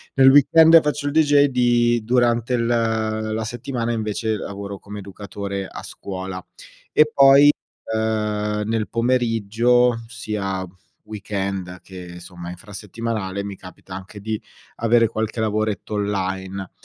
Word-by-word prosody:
nel 135 Hz, 0 st, +7 dB
weekend 160 Hz, +4 st, +7 dB
faccio 150 Hz, -1 st, -2 dB
il -, -, 0 dB
dj 145 Hz, -2 st, +4 dB
di 120 Hz, -2 st, +2 dB
durante 120 Hz, 0 st, +1 dB
l 115 Hz, -, 0 dB, 0.7 s
la 110 Hz, -, -2 dB
settimana 120 Hz, +1 st, -3 dB
invece 110 Hz, -1 st, -2 dB
lavoro 100 Hz, 0 st, -7 dB
come 105 Hz, 0 st, -9 dB
educatore 100 Hz, 0 st, -6 dB
a -, -, -9 dB
scuola. 95 Hz, -2 st, -7 dB, 0.7 s
E 150 Hz, 0 st, +4 dB
poi, 140 Hz, +1 st, +7 dB, 0.4 s
ehm, 105 Hz, -1 st, -1 dB
nel 110 Hz, -1 st, -1 dB
pomeriggio, 120 Hz, 0 st, +2 dB
sia 105 Hz, -5 st, -4 dB, 0.4 s
weekend 95 Hz, -3 st, -4 dB
che 90 Hz, -2 st, -10 dB
somma 85 Hz, -1 st, -9 dB
infrasettimanale, 100 Hz, +1 st, -5 dB
mi 100 Hz, -1 st, -7 dB
capita 95 Hz, 0 st, -12 dB
anche 95 Hz, +2 st, -9 dB
di 110 Hz, +1 st, -3 dB, 0.4 s
avere 115 Hz, 0 st, +3 dB
qualche 110 Hz, +1 st, -3 dB
lavoretto 110 Hz, -1 st, -2 dB
online. 95 Hz, -2 st, -3 dB
110 Hz, 120 wpm, -21 LUFS, 100-120 Hz, 0.7 s, nel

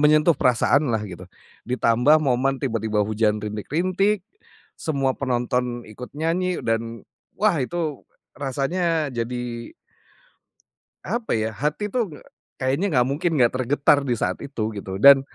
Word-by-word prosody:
menyentuh 150 Hz, +1 st, +4 dB
perasaanlah, 125 Hz, -1 st, +2 dB
gitu. 90 Hz, +1 st, -9 dB, 0.4 s
Ditambah 125 Hz, +5 st, +3 dB
momen 135 Hz, +1 st, +1 dB
tiba-tiba 110 Hz, -4 st, 0 dB
hujan 105 Hz, 0 st, 0 dB
rintik-rintik, 180 Hz, -, 0 dB, 0.6 s
semua 140 Hz, -4 st, 0 dB
penonton 125 Hz, -1 st, -1 dB
ikut 120 Hz, +5 st, -10 dB
nyanyi, 170 Hz, +4 st, -1 dB
dan, 115 Hz, 0 st, -2 dB, 0.4 s
wah 205 Hz, -6 st, +3 dB
itu 155 Hz, +1 st, -3 dB, 0.3 s
rasanya 150 Hz, +3 st, 0 dB
jadi 120 Hz, 0 st, -4 dB, 1.3 s
apa 225 Hz, -, -1 dB
ya, 110 Hz, 0 st, -1 dB
hati 150 Hz, -, -2 dB
tuh 240 Hz, -5 st, 0 dB
nge 150 Hz, -4 st, -12 dB, 0.3 s
kayaknya 135 Hz, +9 st, 0 dB
nggak 125 Hz, 0 st, +4 dB
mungkin 165 Hz, +5 st, 0 dB
nggak 120 Hz, -4 st, +4 dB
tergetar 140 Hz, +3 st, +3 dB
di 120 Hz, -, +1 dB
saat -, -, -2 dB
itu, 110 Hz, -6 st, -3 dB
gitu. 95 Hz, -2 st, -6 dB
Dan 135 Hz, +6 st, +8 dB
130 Hz, 125 wpm, -23 LUFS, 115-155 Hz, 1.3 s, Dan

